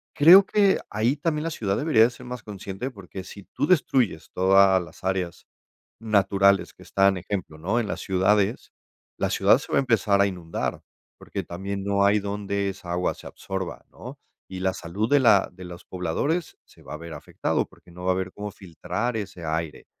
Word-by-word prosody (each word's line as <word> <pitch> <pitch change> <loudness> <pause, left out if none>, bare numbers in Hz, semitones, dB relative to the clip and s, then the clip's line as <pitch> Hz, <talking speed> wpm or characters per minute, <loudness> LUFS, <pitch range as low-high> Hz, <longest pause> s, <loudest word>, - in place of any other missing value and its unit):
creo 180 +6 +8
que 200 -1 +3
ahí 115 +6 +1
también 150 0 -1
la 165 - -1
ciudad 105 -9 -2
debería 145 -8 +4
de 120 - +4
ser 125 +1 -13
más 125 -2 -7
consciente, 100 +4 -6
porque 95 -3 -9
si 100 0 -11
tú 145 - 0
destruyes 130 - +1
todas 95 0 +5
las 85 +1 -13
áreas 95 -3 -2 0.6
naturales 100 -2 +3
que - - -17
están, 95 0 +2
ejemplo, 90 -3 -5
¿no?, 100 +9 0
en 110 - -2
las - - -4
ciudades, 100 +3 +1 0.5
la - - 0
ciudad - - +4
se - - -10
va - - +4
a - - +5
empezar 110 -6 +2
a 100 - +5
inundar, 90 -4 -4 0.4
porque - - -5
también 95 +2 -5
no 100 0 +2
hay 105 +1 +4
donde 100 0 -2
esa 90 -2 -8
agua 90 +1 0
se - - -14
absorba, 95 -2 -6
¿no? - - -10 0.3
Y 95 -1 -7
la 95 0 +1
salud 95 +7 -3
de 145 -1 +5
la 100 -6 +5
de 90 0 -11
los 90 0 -10
pobladores 95 - -2
se - - -21
va - - -8
a - - -4
ver 85 +1 -9
afectado, - - -2
porque 90 - -21
no 90 +1 -10
va 95 - +3
a - - 0
ver 95 0 -3
cómo 105 0 -6
filtrar 95 +5 -4
ese 100 -5 -6
aire 80 0 -3
100 Hz, 200 wpm, -25 LUFS, 90-110 Hz, 0.6 s, creo